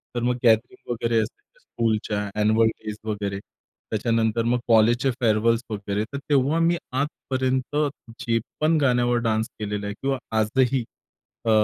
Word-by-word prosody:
तर 120 - -1
मग 125 0 +2
गॅदरिंग 115 +1 +2
वगैरे 115 -1 0
असायच्या 410 - -6
स्कूलच्या 105 - -1
अँन्यूअल 110 +2 +4
डेज 105 -1 -6
वगैरे. 100 -2 -3 0.5
त्याच्यानंतर 115 +1 +1
मग 120 +1 +1
कॉलेजचे 120 +3 +4
फेअरवेल्स 115 -1 +2
वगैरे. 100 -1 -2
तर - - -2
तेव्हा 145 +3 +3
मी 170 +1 +3
आजपर्यंत 130 -1 -1 0.4
जे 115 -1 +1 0.2
पण 160 +1 +4
गाण्यावर 120 -2 +3
डान्स 110 0 +1
केलेला 105 -1 -3
आहे 100 - -3
किंवा 135 0 0 0.2
आजही 125 +4 +2 0.6
अ, - - +1
115 Hz, 140 wpm, -24 LUFS, 110-130 Hz, 0.6 s, अँन्यूअल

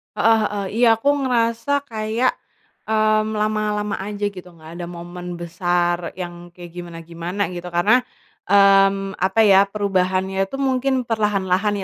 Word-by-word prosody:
Heeh 225 0 +4
heeh, 205 -1 -4
iya 245 - +5
aku 225 +6 0 0.2
ngerasa 240 +4 0
kayak, 220 +3 0 0.6
mmm, 215 0 +1
lama-lama 210 -1 -1
aja 205 +1 -6
gitu, 185 -2 -11
nggak 160 0 -13
ada 175 - -4
momen 175 0 -8
besar 175 0 -1
yang 175 -1 -8
kayak 175 -1 -11
gimana-gimana 170 +2 -7
gitu, 180 0 -7
karena, 180 +8 +3 0.5
mmm, 195 0 +4
apa 190 +4 +2
ya, 195 -1 +6
perubahannya 190 -2 -1
itu 270 - -7
mungkin 265 -1 0
perlahan-lahan 205 -3 0
195 Hz, 130 wpm, -21 LUFS, 175-215 Hz, 0.6 s, ya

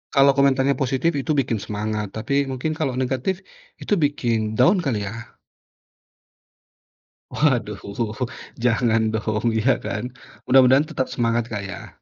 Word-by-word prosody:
Kalau 140 0 +6
komentarnya 140 0 +3
positif, 135 +5 +1
itu 155 - -2
bikin 115 -3 0
semangat. 105 0 -3
Tapi 110 - -3 0.2
mungkin 130 +5 -2
kalau 135 -5 0
negatif, 130 +8 -1 0.5
itu - - -1
bikin 120 -5 +1 0.2
down 185 +4 +5
kali 105 -7 -1
ya? 115 +2 -8 2.0
Waduh, 120 -8 +1 0.8
jangan 115 -1 +2
dong, 110 +1 -2
iya, 110 +4 +2
kan. 120 +4 -4 0.3
Mudah-mudahan 130 +2 +6
tetap 130 - -1
semangat, 115 -1 0
Kak 105 -4 -4
ya. 95 0 -9
125 Hz, 125 wpm, -22 LUFS, 110-135 Hz, 2.0 s, Kalau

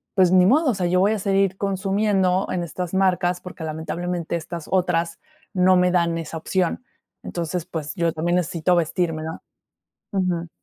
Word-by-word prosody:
"Pues 185 -2 +5
ni 185 -1 +6
modo, 295 - +4
o - - -1
sea, 180 -2 -1
yo 180 +1 +2
voy 205 +3 +3
a 215 - -2
seguir 195 -1 +1
consumiendo 195 -1 +1
en 180 - -1
estas 180 +1 -5
marcas 180 -2 +1
porque, 180 -2 -9
lamentablemente, 170 +2 -3
estas 170 0 -6
otras 175 -2 +1 0.3
no 185 0 +4
me 180 0 +3
dan 170 -2 +2
esa 165 0 -5
opción. 185 +7 -1 0.4
Entonces, 170 0 -3
pues, 155 0 -5
yo 170 -2 0
también 175 +3 0
necesito 175 +1 +1
vestirme, 165 -1 0
¿no?" 160 0 -6 0.7
Ujú. 180 -3 -1
180 Hz, 170 wpm, -23 LUFS, 170-190 Hz, 0.7 s, ni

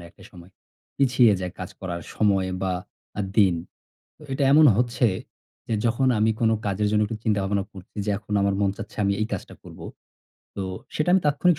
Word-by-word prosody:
না - - -11
একটা - - -19
সময়। 90 0 -14 0.5
পিছিয়ে 125 -4 +4
যায় 90 -1 -4
কাজ - - -6
করার 85 -2 -4
সময় 100 -3 +2
বা 95 -1 0 0.5
আ - - +1 0.2
দিন। 100 -5 +5 0.6
তো - - -19
এটা 135 +1 +1
এমন 155 +1 +7
হচ্ছে, 120 0 +2 0.6
যে 115 - 0
যখন 120 +3 +1
আমি 110 +1 +3
কোনো 110 -1 +3
কাজের 100 +1 0
জন্য 105 0 +3
একটু 110 - -5
চিন্তা-ভাবনা 100 -2 +1
করছি 95 +2 -14
যে, 105 - -1
"এখন 105 - -10
আমার 100 0 +2
মন 100 -1 +2
চাচ্ছে, 110 -2 -9
আমি 100 - +2
এই 110 - +1
কাজটা - - -5
করব।" - - -13 0.8
তো 100 - -2 0.3
সেটা 155 - 0
আমি 190 - +5
তাৎক্ষণিক 150 +3 +3
105 Hz, 190 wpm, -24 LUFS, 95-120 Hz, 0.8 s, এমন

